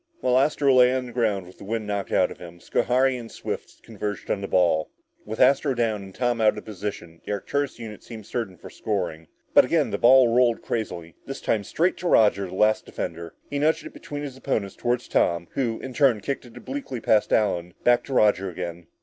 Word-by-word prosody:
While 125 0 +3
Astro 140 -1 +3
lay 125 -1 +6
on 130 -1 -2
the 120 - -9
ground 110 -6 0
with 90 - -16
the - - -10
wind 110 +2 -3
knocked 100 -1 -3
out - - +3
of - - -10
him, 85 -1 -11
Schohari 130 +7 +1
and 115 -1 -10
Swift - - -7
converged 105 -4 -5
on 100 - -1
the 100 - -4
ball. 85 -5 +2 0.4
With 110 +1 -5
Astro 135 +1 +4
down 110 -3 0
and 95 -1 -11
Tom 120 -2 0
out 110 -1 +4
of - - -8
position, 95 -5 -7
the - - -6
Arcturus 140 +8 -2
unit 110 -3 -8
seemed 110 -3 -10
certain 110 -7 -4
of - - -10
scoring. 90 -7 -3 0.3
But - - +8
again - - +1
the - - -2
ball 125 -1 +6
rolled 120 -2 +3
crazily, 85 -8 -4
this - - -5
time 105 -2 0
straight 170 - 0
to 180 - -3
Roger, 105 - +4
the 90 - -8
last 105 +2 +2
defender. 85 0 -6 0.2
He 140 - -1
nudged 160 +1 +1
it - - -9
between 145 0 -7
his 140 -3 -6
opponents 100 -6 -2
toward 120 0 0
Tom, 85 -7 0
who, 120 -4 -1
in 130 - -7
turn, 130 -5 +3
kicked 135 +4 -3
it 120 - -14
obliquely 270 - -5
past 110 -1 +2
Allen 90 -5 +1
back 120 0 +4
to 135 - -6
Roger 105 -5 +3
again. 85 -1 -6
110 Hz, 220 wpm, -25 LUFS, 95-125 Hz, 0.4 s, But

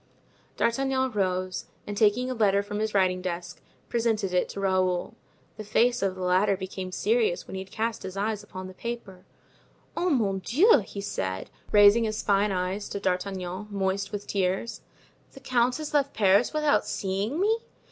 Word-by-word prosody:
D'Artagnan 260 +2 +1
rose, 185 -2 -1 0.2
and 205 - -5
taking 220 +4 +3
a 255 - -2
letter 200 -4 +2
from 205 +1 -4
his 215 -1 -2
writing 185 -1 +2
desk, 175 -1 -5 0.3
presented 225 -5 0
it 180 - +1
to - - -6
Raoul. 185 -2 +1 0.4
The 215 - -6
face 235 +4 +2
of 195 -1 0
the 185 - -5
latter 190 +2 +3
became 190 -1 -6
serious 460 - +1
when - - -9
he 190 - -3
had 190 - -10
cast 225 +1 -2
his 190 0 -7
eyes 210 +1 -1
upon 185 0 -8
the 185 - -9
paper. 195 -4 -7 0.7
"Oh, 360 - +1
mon 210 - +1
Dieu!" 290 - +5
he 200 -1 -7
said, 95 - -4 0.2
raising 205 +2 +6
his 215 0 -2
fine 200 0 +2
eyes 185 +2 -2
to 200 - -4
D'Artagnan, 185 0 -2
moist 195 0 -1
with 205 -1 -5
tears, 190 +3 -1 0.5
"the - - -11
count 250 -1 +1
has 310 -1 -6
left 280 -1 +1
Paris 200 +2 +4
without 300 -1 +2
seeing 200 - -2
me?" 440 +4 +2
200 Hz, 175 wpm, -27 LUFS, 190-235 Hz, 0.7 s, raising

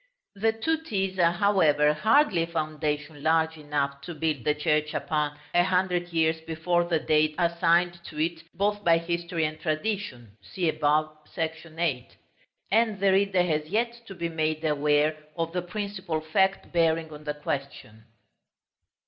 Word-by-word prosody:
The 220 +2 +1
two 320 +9 -1
T's 195 -9 -2
are, 170 -1 +5
however, 160 -6 +3
hardly 220 - +3
a 165 - -1
foundation 155 -2 -3
large 160 +1 +2
enough 145 -2 -2
to 170 +4 -7
build 155 -4 -2
the 150 - +2
church 150 0 0
upon, 150 -1 -1 0.2
a 175 - +5
hundred 180 -1 +1
years 160 -1 +1
before 165 +2 0
the 170 -1 +1
date 155 0 +2
assigned 170 0 +2
to 150 - -10
it 165 +1 -1
both 205 +2 0
by 170 -2 +5
history 170 0 -2
and 155 0 -4
tradition 155 - -3
(see 165 - -3
above, 155 0 +1 0.2
§ 160 0 -4
VIII.): 155 -8 -1 0.6
and 220 -1 +2
the 195 0 +3
reader 190 -1 +3
has 155 -3 -1
yet 235 +4 -1
to 195 - -9
be 170 -1 -2
made 155 -1 -2
aware 150 0 +2 0.2
of 165 0 -2
the 180 - 0
principal 190 -3 -4
fact 190 +5 0
bearing 165 -2 +1
on 150 0 -10
the 150 0 -3
question. 135 -7 -5
165 Hz, 155 wpm, -27 LUFS, 150-180 Hz, 0.6 s, are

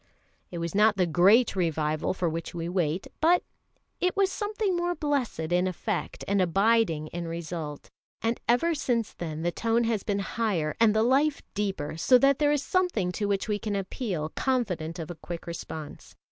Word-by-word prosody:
It 175 - -6
was 170 0 -3
not 210 +1 +4
the 185 - +3
Great 195 +8 +4
Revival 155 -3 0
for 180 - 0
which 165 +1 -4
we 165 0 -3
wait, 175 -1 -1 0.2
but 345 +3 +4 0.6
it 360 +2 0
was 390 -1 +3
something 415 -2 -1
most 350 0 -1
blessed 285 - -1
in 180 +1 +3
effect 185 +2 -3
and 200 -1 +2
abiding 195 -3 +2
in 170 0 -5
result; 165 -3 -5 0.3
and 230 +1 -1
ever 250 +9 +3
since 240 -7 -1
then 160 -2 -5
the 175 - +1
tone 230 +5 +1
has 225 -3 0
been 200 -1 -1
higher 195 -6 -1
and 220 -2 +5
the 220 - +4
life 280 +5 +2
deeper, 190 -7 -2
so 250 +10 +5
that 275 +1 +3
there 295 -1 +3
is 290 -1 +1
something 355 - +1
to 205 +2 -2
which 200 0 0
we 210 -1 0
can 210 -2 -3
appeal 190 -5 -3
confident 185 -10 -1
of 165 -1 -5
a - - -7
quick 170 -1 -6
response. 160 -3 -8
200 Hz, 185 wpm, -27 LUFS, 170-245 Hz, 0.6 s, and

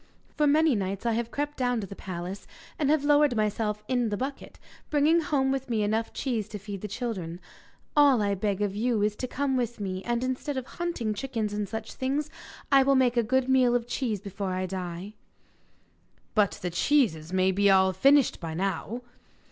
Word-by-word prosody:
For 300 - +3
many 310 +1 +4
nights 195 0 -2
I 235 - +2
have 230 +1 -1
crept 290 +3 -3
down 245 -2 +1
to 205 - -4
the 195 - -9
palace, 185 +1 -6 0.3
and 290 -3 +1
have 305 -1 +3
lowered 290 -2 +4
myself 210 0 -1
in 245 -2 +1
the 205 - -2
bucket, 270 +4 -5 0.3
bringing 305 +3 +4
home 275 -3 +1
with 270 -1 -3
me 220 -3 +1
enough 220 +2 0
cheese 235 -6 -2
to 210 - -5
feed 200 -1 -7
the 210 - -4
children. 195 -6 -4 0.6
All 285 -4 +6
I 200 -1 +1
beg 200 +1 -1
of 200 -1 -2
you 225 -1 +1
is 210 0 +1
to 255 - -3
come 270 +1 -1
with 240 -2 -2
me, 190 -2 -4
and, 240 +1 -1
instead 260 +2 -2
of 260 - -3
hunting 335 -10 -3
chickens 220 -2 -3
and 205 -1 -3
such 220 -1 -5
things, 285 +4 -2 0.4
I 275 -1 +7
will 275 +1 +3
make 255 -2 +3
a 240 - +4
good 260 +3 +1
meal 255 -2 +4
off 240 -1 0
cheese 235 -5 -2
before 195 -1 -4
I 185 0 -1
die.' 185 +1 -5 1.2
'But 210 -3 +3
the 180 - -2
cheeses 175 - +1
may 185 0 +3
be 200 +2 +3
all 190 -1 +5
finished 275 +8 +4
by 160 -2 -5
now? 195 +6 -2
225 Hz, 200 wpm, -27 LUFS, 200-265 Hz, 1.2 s, I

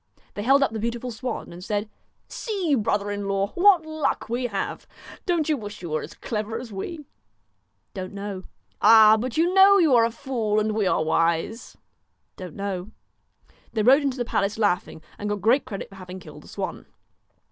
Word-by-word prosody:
They 205 - -5
held 270 +5 +4
up 275 - 0
the 220 - -4
beautiful 235 +2 -3
swan, 235 -4 -5
and 175 +1 -10
said: 205 +2 -2 0.2
' - - -46
See, 390 -9 -2
brother 205 -4 0
in 205 -1 -4
law, 195 0 0
what 360 -3 +5
luck 315 -7 -2
we 245 +2 -1
have. 200 -4 -4 0.4
Don't 340 -4 +1
you 310 - +2
wish 210 -6 -8
you 170 - -5
were 155 - 0
as - - -9
clever 220 0 -4
as 235 -3 -9
we? 300 - -6 0.4
' - - -47
' - - -48
Don't 185 -3 -6
know.' 200 -1 -6 0.4
'Ah! 215 0 +8
but 245 +4 -4
you 345 +3 +2
know 390 +1 +7
you 325 -7 +4
are 230 - +6
a - - 0
fool 230 -3 -1
and 215 0 0
we 210 -2 0
are 160 - +2
wise.' 165 +8 -1 0.6
1 185 - -6
Don't 165 - -14
know.* 195 -1 -4 0.8
They 220 -2 0
rode 265 +6 +6
into 275 -2 -1
the 245 - -2
palace 200 -2 -1
laughing, 180 -6 -1 0.2
and 210 - -3
got 205 - 0
great 235 +7 +3
credit 195 - -6
for 195 - -14
having 185 0 -9
killed 185 - -12
the - - -17
swan. - - -6
220 Hz, 205 wpm, -24 LUFS, 200-265 Hz, 0.8 s, Ah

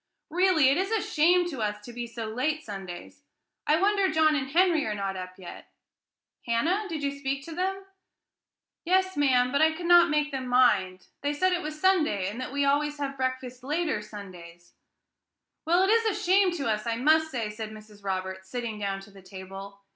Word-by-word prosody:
"Really, 350 -5 +4
it 275 - +2
is 385 +2 0
a 445 0 +1
shame 350 +1 +3
to 265 -6 -5
us 210 -1 -2
to 240 - -10
be 240 0 -5
so 230 -1 -6
late 280 +8 -2
Sundays. 195 +3 -8 0.5
I 305 +2 +4
wonder 400 0 +2
John 310 -1 +3
and 265 -2 -2
Henry 340 0 +3
are 210 - -2
not 195 -1 -3
up 185 0 -7
yet: 185 -2 -11 0.8
Hannah, 335 - +1
did 315 -3 -4
you 280 - 0
speak 275 -1 -4
to 330 - -8
them?" 385 +3 -2 1.0
"Yes, 375 +1 +1
ma'am, 255 -3 +3
but 280 +2 +1
I 315 0 +4
could 340 +2 -7
not 345 0 +6
make 300 0 +1
them 260 -2 -4
mind; 200 -8 +2 0.2
they 285 +1 -1
said 370 +5 +1
it 355 - 0
was 305 -2 -6
Sunday, 305 - +2
and 220 +6 -5
that 255 - -5
we 285 0 0
always 295 +1 +1
have 280 -1 -4
breakfast 260 -1 -4
later 305 -3 -1
Sundays." 180 -5 -11 0.9
"Well, 350 +3 +3
it 385 - +3
is 455 0 +3
a 430 - -1
shame 380 +1 +4
to 285 -8 -3
us, 215 0 -1
I 230 - 0
must 315 +6 +3
say," 230 -7 -3
said 215 0 -6
Mrs. 215 -1 -14
Roberts, 190 -1 -4
sitting 235 -2 -4
down 195 -1 -3
to 195 - -15
the 195 0 -15
table. 195 +1 -10
270 Hz, 200 wpm, -27 LUFS, 210-320 Hz, 1.0 s, not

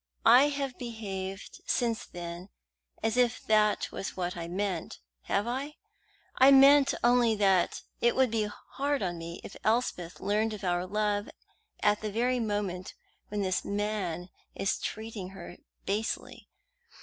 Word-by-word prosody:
I 265 +4 +8
have 280 -3 -3
behaved 200 -5 -6
since 230 -2 0
then 175 +2 -7 0.5
as 225 +2 +1
if 245 -1 +3
that 215 -1 +3
was 195 - -5
what 180 -1 -2
I 170 -1 -5
meant, 185 -1 -3 0.3
have 200 +2 0
I? 270 +5 -3 0.6
I 260 +1 +8
meant 275 +1 +7
only 240 -2 +4
that 195 -4 +2 0.2
it 235 - +3
would 260 -3 +3
be 220 -2 +1 0.3
hard 280 -1 0
on 175 -2 -2
me 170 +1 -7
if - - -9
Elspeth 215 -7 0
learned 215 +2 0
of 205 - -11
our 180 0 0
love 210 +1 0 0.5
at 210 0 +3
the 215 -1 -3
very 245 +4 +1
moment 205 -5 -3 0.3
when 205 -1 -2
this 185 -1 0
man 200 -4 -2 0.3
is 195 - 0
treating 220 -4 -5
her 175 - -9 0.3
basely. 210 +3 -3
210 Hz, 145 wpm, -29 LUFS, 190-240 Hz, 0.6 s, I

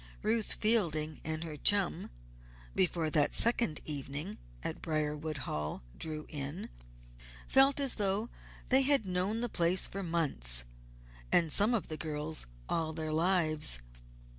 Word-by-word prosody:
Ruth 220 0 +1
Fielding 160 -9 +2
and 160 +1 -4
her 160 -2 -7
chum, 200 +4 +3 0.6
before 170 -4 -1
that 150 -2 +1
second 230 -9 +2
evening 140 -4 -5 0.2
at - - -6
Briarwood 155 0 -3
Hall 75 -3 -5
drew 155 -1 -6
in, 145 - -7 0.8
felt 270 +1 +4
as 275 -2 +3
though 205 +2 -1 0.4
they 265 +1 +5
had 270 -4 +3
known 190 +5 -2
the 240 - -1
place 180 -3 +3
for 195 - -7
months 140 - +1 0.7
and 165 -3 +2
some 215 +8 +3
of 215 - -3
the 155 - -7
girls 155 - -2 0.2
all 160 -1 -2
their 155 -1 -5
lives. 160 - +3
160 Hz, 135 wpm, -31 LUFS, 150-205 Hz, 0.8 s, they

